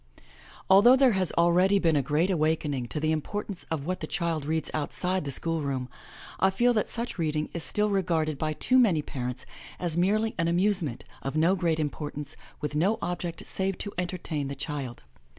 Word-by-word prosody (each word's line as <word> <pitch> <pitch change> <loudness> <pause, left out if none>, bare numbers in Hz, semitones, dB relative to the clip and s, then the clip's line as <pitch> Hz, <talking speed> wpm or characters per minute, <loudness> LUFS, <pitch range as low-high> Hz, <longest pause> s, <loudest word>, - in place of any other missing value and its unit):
Although 205 +7 +7
there 265 -1 +5
has 190 -4 0
already 180 +4 +4
been 165 -5 +2
a 145 - +3
great 150 +8 +1
awakening 155 -6 0
to 150 - -4
the 155 +1 +1
importance 195 +5 -3
of 155 -4 -3
what 185 +2 -2
the - - -5
child 165 -5 -2
reads 160 -1 -1
outside 180 +3 -1
the 140 - -3
school 165 +4 0
room, 130 -3 -2 0.5
I 190 - +5
feel 240 +6 +3
that 215 - 0
such 235 -5 -4
reading 155 -2 -1
is 170 - -4
still 210 0 0
regarded 160 -6 0
by 155 0 0
too 255 +11 +3
many 180 -11 +4
parents 125 -3 -5 0.3
as 170 -2 -2
merely 215 +5 +2
an 165 - +2
amusement, 175 - +1 0.2
of 135 +2 -4
no 170 +5 +4
great 170 -4 0
importance, 145 -1 -3 0.3
with 150 0 -3
no 185 +9 +2
object 175 -1 -4
save 190 0 -2
to 205 - -4
entertainthe 155 -6 -3
child. 140 - -5
165 Hz, 185 wpm, -27 LUFS, 150-190 Hz, 0.5 s, Although